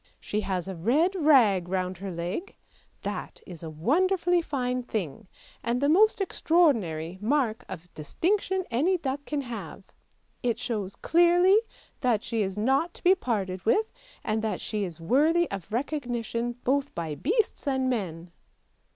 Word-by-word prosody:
she 210 - -2
has 185 -3 -2
a 190 - -4
red 275 - +2
rag 245 - +4
round 185 -1 -2
her 195 0 -5
leg; 175 - -4 0.5
that - - -5
is 175 -4 -10
a 165 - -6
wonderfully 350 - +2
fine 255 -5 -2
thing, 210 - -4 0.3
and 235 +1 0
the 285 - +2
most 420 +8 +4
extraordinary 220 - +1
mark 245 -1 +1
of 180 -2 -9
distinction 375 - 0
any 325 +11 +2
duck 280 -3 -3
can 295 -2 -1
have. 240 -4 -7 0.6
It 235 -2 0
shows 220 -6 -3
clearly 350 +4 +5 0.4
that 235 -5 +1
she 225 -2 -1
is 190 -1 -2
not 270 +10 +1
to - - -13
be 365 - +7
parted 195 - -2
with, 430 - +2 0.3
and 220 0 0
that 215 -4 -2
she 210 -1 -3
is 170 -3 -8
worthy 305 - +3
of 195 0 -6
recognition 240 -2 -2
both 280 +2 0
by 165 -3 -3
beasts 400 - -1
and 265 -1 +1
men! 180 -8 -3
240 Hz, 150 wpm, -27 LUFS, 190-310 Hz, 0.6 s, be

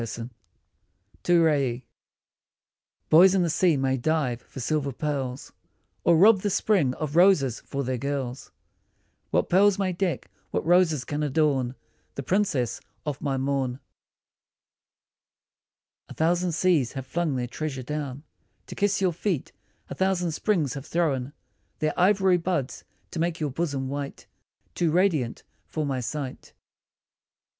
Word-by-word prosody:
88 115 +1 -6 0.9
TO 175 -1 +4
RAIE 135 -6 +1 1.3
BOYS 180 +4 +7
in 185 - +3
the 170 - 0
sea 170 -2 +3
may 135 0 +1
dive 130 -3 0
for - - -11
silver 140 +2 -1
pearls, 135 -2 -4 0.5
Or 170 -1 +5
rob 205 +4 +7
the 205 - 0
spring 180 -10 +2
of 155 -1 -4
roses 165 - +4
for 140 0 -4
their 130 -1 -2
girls; 135 -2 -4 0.8
What - - +1
pearls 195 +2 +4
may 190 -2 0
deck, 175 -1 -2 0.2
what - - -2
roses 165 -6 +3
can 145 +2 -3
adorn 140 -4 +1 0.4
The 140 - -4
princess 145 - 0 0.2
of 145 -2 -4
my 135 -2 -1
morn? 135 -1 -1 2.3
A - - -9
thousand 175 +2 +1
seas 160 -7 +2
have 135 -2 -5
flung 165 0 -1
their 125 -1 -1
treasure 135 +1 -5
down 145 0 -5 0.4
To - - -9
kiss 200 -1 0
your 185 -3 +2
feet, 175 -3 -2 0.4
a - - -6
thousand 190 -3 0
springs 160 - 0
have 140 +2 -7
thrown 145 -6 0 0.5
Their 155 0 0
ivory 190 0 +4
buds 165 -6 -2 0.3
to 165 - -5
make 170 0 -1
your 150 -3 -2
bosom 140 -3 -2
white 140 +1 -5 0.5
Too 170 - +1
radiant 160 -8 +1 0.2
for 155 -1 -3
my 135 -2 -1
sight. 130 +2 -5
150 Hz, 140 wpm, -26 LUFS, 135-175 Hz, 2.3 s, BOYS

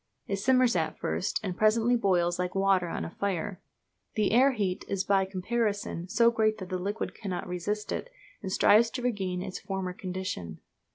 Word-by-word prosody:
It 195 - -2
simmers 255 +2 +3
at 160 -2 -1
first, 80 +2 -1
and 185 -3 -3
presently 225 +4 +3
boils 175 -6 +2
like 180 +1 -2
water 195 -2 +3
on - - -3
a - - -7
fire. 195 -1 -3 0.5
The 210 -2 +2
air 260 +4 +5
heat 195 -6 -1
is 195 -1 -1
by 195 -1 +3
comparison 200 -2 -2
so 235 +3 +4
great 220 -1 +1
that 185 -2 -7
the 185 -1 -2
liquid 200 +4 -3
cannot 190 -4 -5
resist 185 +4 -3
it, - - -3 0.3
and 190 -3 -4
strives 220 +4 +5
to 245 +2 -5
regain 190 -7 -1
its 190 -1 -5
former 190 -2 -4
condition. 180 - -5
195 Hz, 180 wpm, -29 LUFS, 180-215 Hz, 0.5 s, air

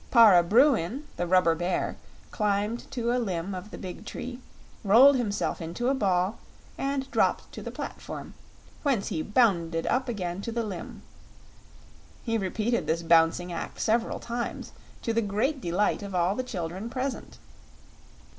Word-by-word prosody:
Para 220 -8 +8
Bruin, 235 - +3
the 175 - -2
rubber 180 -2 +4
bear, 175 +3 -1 0.4
climbed 210 +2 -1
to 235 -2 -1
a 250 - +1
limb 190 -3 -3
of 185 +3 -7
the - - -8
big 185 +2 -7
tree, 245 +3 -6 0.4
rolled 245 +8 +7
himself 210 -7 -1
into 175 +10 -2
a - - +3
ball, 190 -4 +1 0.4
and 275 0 -2
dropped - - +1
to - - -8
the - - -6
platform, - - -7 0.5
whence 265 -9 0
he 160 - -2
bounded 170 -6 +2
up 255 +1 0
again 185 -4 -3
to 230 - -4
the 235 0 -1
limb. 195 -5 -7 1.2
He 230 -1 -1
repeated 215 +5 -1
this 165 +1 0
bouncing 165 +2 +3
act 165 - -6
several 230 +2 +1
times, 240 0 -4 0.3
to 230 - 0
the 230 - +2
great 230 +8 -1
delight 180 +4 0
of 200 -2 -6
all 175 +2 +2
the 255 - -2
children 190 -3 -5
present. 260 +2 -4
210 Hz, 155 wpm, -27 LUFS, 180-240 Hz, 1.2 s, Para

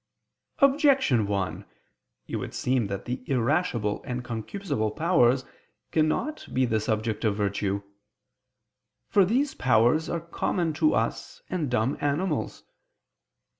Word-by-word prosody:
Objection 270 - +4
1: 95 -2 -2 0.6
It - - -4
would - - -6
seem 125 -4 +1
that 100 0 -5
the 125 +1 -3
irascible 125 - 0
and 125 -1 -4
concupiscible 115 - -3
powers 130 -7 +3 0.5
cannot 160 - 0
be 130 0 +2
the 110 -2 +1
subject 110 +1 -2
of 105 -3 +2
virtue. 100 -1 -1 1.3
For 200 - +5
these 260 +9 +1
powers 125 +6 +3
are 170 - -1
common 170 0 -1
to 310 - +2
us - - -2
and 165 -7 -1
dumb 125 +2 0
animals. 145 +7 -1
125 Hz, 120 wpm, -26 LUFS, 110-170 Hz, 1.3 s, For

